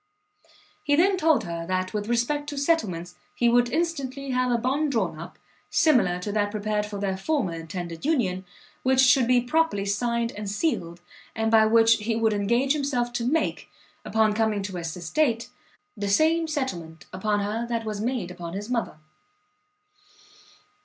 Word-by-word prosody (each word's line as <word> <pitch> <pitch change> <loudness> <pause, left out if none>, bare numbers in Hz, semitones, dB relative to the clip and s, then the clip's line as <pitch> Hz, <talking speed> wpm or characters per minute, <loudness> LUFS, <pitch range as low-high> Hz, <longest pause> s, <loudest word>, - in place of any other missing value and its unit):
He 290 -1 +2
then 380 +5 +4
told 315 -9 +3
her 170 -2 -5
that 185 +1 -1
with 210 -1 -3
respect 290 +5 0
to 285 - -6
settlements, 200 - 0 0.2
he 240 - +2
would 240 0 +4
instantly 275 -4 -2
have 255 0 +1
a 240 - +3
bond 275 +5 0
drawn 190 - -1
up, 170 +3 -9 0.3
similar 245 - +3
to 205 - -3
that 205 0 0
prepared 210 0 -2
for 205 -1 -6
their 195 -1 -1
former 200 - -1
intended 165 0 -6
union, 215 - 0 0.4
which 260 0 +2
should 260 -2 +5
be 250 0 +4
properly 245 -6 +1
signed 235 +3 0
and 205 -1 -6
sealed, 175 - -2 0.3
and 225 0 0
by 220 -1 +6
which 225 +1 +5
he 225 +1 -2
would 225 -1 +2
engage 235 +7 +1
himself 265 -5 -1
to 240 - -2
make, 315 +6 -1 0.3
upon 220 -1 +2
coming 215 -2 0
to 190 -2 -5
his 165 -1 -5
estate, 230 - 0 0.5
the 205 - -3
same 320 +9 +3
settlement 175 - -4
upon 205 +2 0
her 220 +4 -2
that 230 -1 -2
was 210 -1 -4
made 230 -6 -2
upon 175 -2 -7
his 205 +5 -5
mother. 235 -10 -2
225 Hz, 165 wpm, -25 LUFS, 195-265 Hz, 0.5 s, by